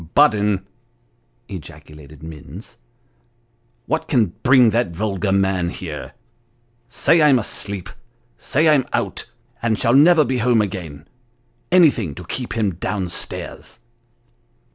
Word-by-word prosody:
" -, -, -40 dB
Budden! 105 Hz, -9 st, +3 dB, 0.4 s
" 120 Hz, +1 st, -43 dB
ejaculated 75 Hz, -, -11 dB
Mir 80 Hz, -2 st, -9 dB
ns, 110 Hz, -, -12 dB, 0.5 s
" 120 Hz, 0 st, -43 dB
what 160 Hz, -, -2 dB
can 110 Hz, -, +1 dB
bring 125 Hz, -3 st, +5 dB
that 115 Hz, -7 st, -1 dB
vulgar 100 Hz, 0 st, -2 dB
man 95 Hz, -2 st, +1 dB
here! -, -, -7 dB, 0.8 s
say 160 Hz, +7 st, +3 dB
I'm 145 Hz, -3 st, +5 dB
asleep 100 Hz, -4 st, -4 dB, 0.5 s
say 155 Hz, +4 st, 0 dB
I'm 140 Hz, -5 st, +3 dB
out, 100 Hz, +4 st, -3 dB, 0.3 s
and 110 Hz, -2 st, 0 dB
shall 115 Hz, +4 st, +1 dB
never 155 Hz, +3 st, +6 dB
be 130 Hz, 0 st, -1 dB
home 120 Hz, 0 st, +3 dB
again 90 Hz, -8 st, -4 dB, 0.6 s
anything 140 Hz, -, +3 dB
to 90 Hz, -, -8 dB
keep 125 Hz, +7 st, -5 dB
him 105 Hz, -5 st, 0 dB
down 95 Hz, 0 st, -3 dB
stairs." 110 Hz, +5 st, -6 dB
110 Hz, 130 wpm, -20 LUFS, 95-125 Hz, 0.8 s, never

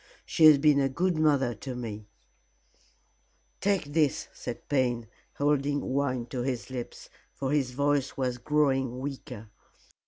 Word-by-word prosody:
She 160 Hz, -, +3 dB
has 155 Hz, -2 st, +9 dB
been 145 Hz, 0 st, +4 dB
a 135 Hz, -1 st, +2 dB
good 175 Hz, +6 st, 0 dB
mother 145 Hz, -5 st, +2 dB
to 130 Hz, +1 st, -7 dB
me 110 Hz, -4 st, -6 dB, 0.8 s
" -, -, -39 dB
"Take 195 Hz, -8 st, 0 dB
this," 150 Hz, -3 st, +1 dB
said 120 Hz, -1 st, -7 dB
Payne, 125 Hz, -5 st, +1 dB, 0.3 s
holding 145 Hz, 0 st, +1 dB
wine 130 Hz, -3 st, 0 dB
to 125 Hz, -, -2 dB
his 125 Hz, 0 st, -3 dB
lips, 125 Hz, -2 st, -7 dB, 0.3 s
for 135 Hz, -1 st, -2 dB
his 145 Hz, -4 st, +1 dB
voice 140 Hz, 0 st, 0 dB
was 125 Hz, -2 st, -1 dB
growing 135 Hz, -4 st, +1 dB
weaker. 130 Hz, -5 st, -7 dB
135 Hz, 145 wpm, -28 LUFS, 125-145 Hz, 0.8 s, has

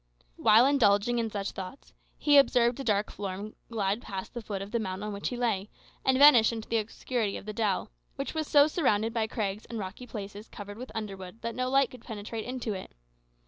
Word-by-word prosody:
While 225 Hz, +4 st, +6 dB
indulging 240 Hz, -4 st, +3 dB
in 225 Hz, -1 st, -1 dB
such 200 Hz, -1 st, -3 dB
thoughts, 190 Hz, +8 st, -9 dB, 0.2 s
he 290 Hz, -1 st, +6 dB
observed 245 Hz, -2 st, +3 dB
a -, -, -3 dB
dark 210 Hz, -3 st, +1 dB
form 200 Hz, +1 st, -5 dB, 0.2 s
glide 210 Hz, -1 st, -1 dB
past 195 Hz, -4 st, -6 dB
the 240 Hz, -, -5 dB
foot 205 Hz, -3 st, -4 dB
of 200 Hz, -, -10 dB
the 235 Hz, -, +1 dB
mound 190 Hz, -2 st, -4 dB
on 210 Hz, 0 st, -3 dB
which 200 Hz, -, -3 dB
he 245 Hz, -, -4 dB
lay, 215 Hz, -5 st, 0 dB, 0.3 s
and 260 Hz, -1 st, +3 dB
vanish 265 Hz, -6 st, +8 dB
in 225 Hz, -1 st, -4 dB
the 230 Hz, +1 st, -1 dB
obscurity 220 Hz, 0 st, -2 dB
of -, -, -10 dB
the 215 Hz, -, -5 dB
dell, 205 Hz, -, -1 dB, 0.2 s
which -, -, -4 dB
was 315 Hz, -1 st, -2 dB
so 290 Hz, -1 st, +6 dB
surrounded 230 Hz, -, +1 dB
by 225 Hz, -1 st, 0 dB
crags 210 Hz, -3 st, -3 dB
and 230 Hz, -, -6 dB
rocky 205 Hz, +5 st, -6 dB
places 205 Hz, -1 st, -7 dB
covered 205 Hz, +1 st, -9 dB
with 255 Hz, -, -7 dB
underwood 195 Hz, -1 st, -6 dB
that 230 Hz, 0 st, -2 dB
no 255 Hz, +1 st, -1 dB
light 270 Hz, -1 st, +3 dB
could 250 Hz, -2 st, -12 dB
penetrate 220 Hz, 0 st, -6 dB
into 245 Hz, -3 st, -3 dB
it. 185 Hz, -, -8 dB
220 Hz, 215 wpm, -29 LUFS, 205-245 Hz, 0.3 s, vanish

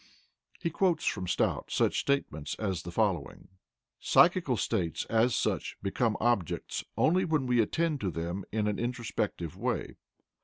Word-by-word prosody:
He 170 Hz, -, -2 dB
quotes 180 Hz, +1 st, +1 dB
from 90 Hz, -, -1 dB
Stout -, -, 0 dB
such -, -, +1 dB
statements 75 Hz, -, -1 dB
as 95 Hz, -6 st, -2 dB
the 85 Hz, -, -7 dB
following: 90 Hz, -7 st, -1 dB, 0.5 s
"Psychical 170 Hz, -9 st, +4 dB
states 90 Hz, -9 st, -1 dB
as 115 Hz, +2 st, +3 dB
such -, -, -1 dB
become 105 Hz, +2 st, 0 dB
objects 120 Hz, -7 st, 0 dB
only 180 Hz, +4 st, +3 dB
when 155 Hz, -6 st, +1 dB
we 125 Hz, -2 st, +3 dB
attend 155 Hz, +6 st, 0 dB
to 95 Hz, -, 0 dB
them 85 Hz, +3 st, -4 dB
in 105 Hz, -1 st, 0 dB
an 105 Hz, -, -1 dB
introspective 110 Hz, -, -3 dB
way. 120 Hz, +6 st, -3 dB
110 Hz, 145 wpm, -30 LUFS, 95-135 Hz, 0.5 s, Psychical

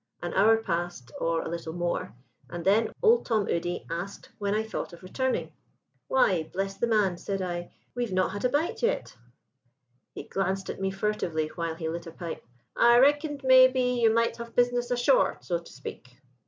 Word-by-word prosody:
An 175 Hz, -, -3 dB
hour 220 Hz, +3 st, +5 dB
passed, 175 Hz, -, -3 dB
or 165 Hz, 0 st, 0 dB
a -, -, -5 dB
little 165 Hz, -1 st, -5 dB
more, 175 Hz, -7 st, -2 dB, 0.4 s
and 170 Hz, -1 st, -6 dB
then 210 Hz, +4 st, +3 dB
Old 465 Hz, +1 st, +5 dB
Tom 215 Hz, -4 st, 0 dB
Udy 175 Hz, +1 st, -2 dB
asked 175 Hz, +4 st, -6 dB
when 200 Hz, 0 st, 0 dB
I 215 Hz, -, +1 dB
thought 220 Hz, -5 st, -5 dB
of 170 Hz, -, -13 dB
returning. 260 Hz, +8 st, -2 dB, 0.6 s
"'Why, 185 Hz, -11 st, +2 dB
bless 195 Hz, +1 st, -2 dB
the 235 Hz, -, -1 dB
man,' 205 Hz, -6 st, +2 dB
said 195 Hz, -1 st, -3 dB
I, 175 Hz, -2 st, -4 dB, 0.2 s
'we've 240 Hz, -3 st, -2 dB
not 185 Hz, 0 st, +1 dB
had 205 Hz, +1 st, -5 dB
a 250 Hz, -, +3 dB
bite 295 Hz, +5 st, -1 dB
yet!' 485 Hz, +1 st, -1 dB, 1.0 s
"He -, -, -6 dB
glanced 195 Hz, 0 st, -2 dB
at -, -, -9 dB
me 195 Hz, -, +1 dB
furtively 190 Hz, -6 st, -1 dB
while 165 Hz, -1 st, -4 dB
he 160 Hz, -1 st, -4 dB
lit 170 Hz, +1 st, -4 dB
a -, -, -7 dB
pipe. 165 Hz, 0 st, -7 dB, 0.3 s
'I 235 Hz, 0 st, +6 dB
reckoned, 290 Hz, +2 st, +3 dB
maybe, 260 Hz, 0 st, +6 dB, 0.2 s
you 225 Hz, -1 st, +5 dB
might 230 Hz, +1 st, +1 dB
have 235 Hz, -1 st, -9 dB
business 245 Hz, 0 st, +2 dB
ashore, 245 Hz, -, +3 dB
so 175 Hz, -2 st, -2 dB
to 170 Hz, -, -15 dB
speak.' 130 Hz, -1 st, -10 dB
195 Hz, 185 wpm, -27 LUFS, 170-240 Hz, 1.0 s, I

